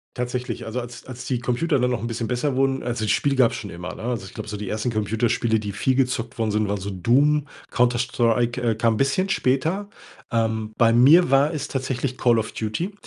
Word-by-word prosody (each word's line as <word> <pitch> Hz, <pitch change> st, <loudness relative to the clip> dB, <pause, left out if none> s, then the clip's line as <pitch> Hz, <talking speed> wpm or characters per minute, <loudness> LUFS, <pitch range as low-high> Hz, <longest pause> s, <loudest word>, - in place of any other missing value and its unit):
Tatsächlich, 125 Hz, -1 st, -3 dB
also 115 Hz, +3 st, -3 dB
als 120 Hz, 0 st, -10 dB
als 125 Hz, -1 st, -8 dB
die 125 Hz, -3 st, -1 dB
Computer 135 Hz, +5 st, 0 dB
dann 125 Hz, 0 st, +2 dB
noch 120 Hz, -, -2 dB
'n -, -, -2 dB
bisschen 115 Hz, 0 st, -3 dB
besser 130 Hz, +3 st, -1 dB
wurden 135 Hz, 0 st, +1 dB
also, 115 Hz, -3 st, -2 dB
das 105 Hz, -, +1 dB
Spiel 140 Hz, -1 st, +1 dB
gab's 125 Hz, -3 st, +4 dB
schon 105 Hz, -, -6 dB
immer, 90 Hz, -1 st, -7 dB
ne? -, -, -10 dB
Also, 120 Hz, -5 st, -3 dB
ich 95 Hz, -, -12 dB
glaube 110 Hz, -1 st, -7 dB
so 105 Hz, -, -4 dB
die 105 Hz, 0 st, -6 dB
1. 110 Hz, +5 st, -2 dB
Computerspiele, 110 Hz, +1 st, 0 dB
die 105 Hz, -1 st, -4 dB
viel 130 Hz, +6 st, 0 dB
gezockt 125 Hz, -2 st, -1 dB
worden 110 Hz, -1 st, 0 dB
sind, 105 Hz, 0 st, +1 dB
waren 100 Hz, +1 st, -1 dB
so 100 Hz, -, -4 dB
„Doom“, 140 Hz, +10 st, +2 dB, 0.2 s
„Counter-Strike“, 120 Hz, 0 st, +1 dB
äh, 115 Hz, -2 st, +1 dB
kam 115 Hz, 0 st, +2 dB
'n -, -, -3 dB
bisschen 140 Hz, -, +1 dB
später. 160 Hz, +6 st, 0 dB, 0.4 s
Ähm, 110 Hz, -2 st, -1 dB
bei 115 Hz, -1 st, +5 dB
mir 140 Hz, +8 st, +6 dB
war 140 Hz, +4 st, +4 dB
es 145 Hz, -2 st, -4 dB
tatsächlich 130 Hz, -1 st, -3 dB
„Call 120 Hz, -2 st, +3 dB
of 110 Hz, -, -4 dB
Duty“ 115 Hz, -, -3 dB
120 Hz, 225 wpm, -23 LUFS, 110-130 Hz, 0.4 s, mir